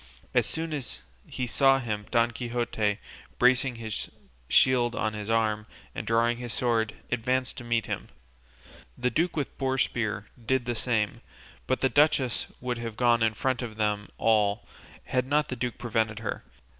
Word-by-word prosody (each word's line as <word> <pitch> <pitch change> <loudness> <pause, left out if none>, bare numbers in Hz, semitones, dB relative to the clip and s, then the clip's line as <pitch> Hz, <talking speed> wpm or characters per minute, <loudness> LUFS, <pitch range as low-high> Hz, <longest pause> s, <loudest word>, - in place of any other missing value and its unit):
As - - +3
soon 160 0 -2
as 135 - -3 0.3
he 130 - -3
saw 135 +2 +4
him 105 -5 -3
Don 120 -1 +3
Quixote, 115 -3 -1 0.4
bracing 125 0 +4
his 110 -2 -4 0.4
shield 120 -2 +4
on 110 -1 0
his 105 0 -5
arm, 110 -1 +1 0.3
and - - -5
drawing 115 +1 +3
his 120 -1 -5
sword, 115 -3 +1 0.2
advanced 125 +1 0
to - - -8
meet 115 -1 0
him; - - -4 0.9
the 125 0 0
duke 170 +2 +1
with 145 - -2
boar 135 -1 +1
spear 110 -5 0 0.2
did 130 +2 +1
the 120 - -1
same; 110 -3 0 0.5
but 130 - 0
the 135 - +4
duchess 145 -4 +3
would 125 -1 -3
have 115 -2 -5
gone 120 -2 +4
in 110 -1 +2
front 130 +1 0
of 115 -3 -5
them 105 -1 0
all 105 -1 +2 0.4
had 130 0 0
not 150 +2 +2
the 130 - -2
duke 125 -1 -3
prevented 110 -2 0
her. 110 -1 -4
120 Hz, 170 wpm, -28 LUFS, 110-130 Hz, 0.9 s, saw